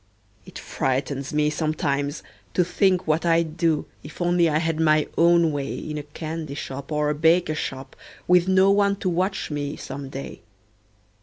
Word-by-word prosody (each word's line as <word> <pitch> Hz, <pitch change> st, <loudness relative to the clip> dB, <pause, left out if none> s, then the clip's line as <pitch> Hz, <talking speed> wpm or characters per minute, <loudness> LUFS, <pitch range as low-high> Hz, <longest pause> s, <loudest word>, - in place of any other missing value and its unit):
It -, -, -10 dB
frightens 135 Hz, +1 st, -2 dB
me 150 Hz, 0 st, +1 dB
sometimes, 145 Hz, -2 st, -2 dB, 0.3 s
to 180 Hz, -, +4 dB
think 185 Hz, 0 st, +1 dB
what 155 Hz, +1 st, +1 dB
I'd 165 Hz, -2 st, +1 dB
do, 165 Hz, -3 st, +1 dB, 0.2 s
If 150 Hz, -, -12 dB
only 175 Hz, -1 st, +3 dB
I 150 Hz, -, +1 dB
had 160 Hz, 0 st, -1 dB
my 155 Hz, -1 st, +3 dB
own 170 Hz, -1 st, +4 dB
way 140 Hz, -2 st, -3 dB
In 150 Hz, -1 st, -5 dB
a 145 Hz, 0 st, -10 dB
candy 155 Hz, -3 st, -5 dB
shop 140 Hz, -1 st, -7 dB
or 150 Hz, 0 st, +1 dB
a -, -, 0 dB
baker 160 Hz, +2 st, +3 dB
shop, 135 Hz, -3 st, -5 dB, 0.3 s
Witn 180 Hz, 0 st, +4 dB
no 190 Hz, +1 st, +5 dB
one 200 Hz, 0 st, +3 dB
to 190 Hz, -1 st, -2 dB
watch 185 Hz, 0 st, -1 dB
me, 145 Hz, -1 st, -3 dB
some 135 Hz, 0 st, -7 dB
day. 135 Hz, +1 st, -8 dB
155 Hz, 170 wpm, -24 LUFS, 145-175 Hz, 0.3 s, no